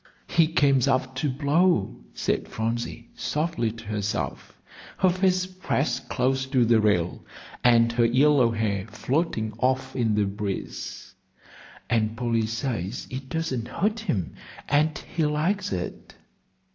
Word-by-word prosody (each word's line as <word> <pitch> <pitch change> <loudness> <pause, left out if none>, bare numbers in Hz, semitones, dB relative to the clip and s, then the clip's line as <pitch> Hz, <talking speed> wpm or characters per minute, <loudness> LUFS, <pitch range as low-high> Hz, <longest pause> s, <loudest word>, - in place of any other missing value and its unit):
"He 165 -2 +4
comes 140 -5 +3
up 130 -1 +1
to 145 +2 0
blow," 145 - +2 0.2
said - - -1
Phronsie, 115 +1 -3
softly 120 -2 -1
to 115 0 -11
herself, 105 -1 -3 0.4
her 185 - +4
face 185 0 +2
pressed 145 -9 -2
close 130 +1 0
to 130 -3 +3
the 115 -1 +4
rail, 90 -5 +1 0.4
and 115 -1 +5
her 120 0 +3
yellow 130 +1 +4
hair 105 -4 -1
floating 125 -7 -1
off 130 +1 0
in 115 -4 +1
the 105 -1 +2
breeze; 100 0 -5 0.7
"and 110 -1 0
Polly 115 -2 0
says 115 -3 -3
it 130 +1 -6
doesn't 135 -8 -2
hurt 210 - -1
him, 95 - -2 0.3
and 150 +2 +2
he 165 - -3
likes 160 +7 0
it." 90 -2 -5
125 Hz, 135 wpm, -26 LUFS, 110-150 Hz, 0.7 s, and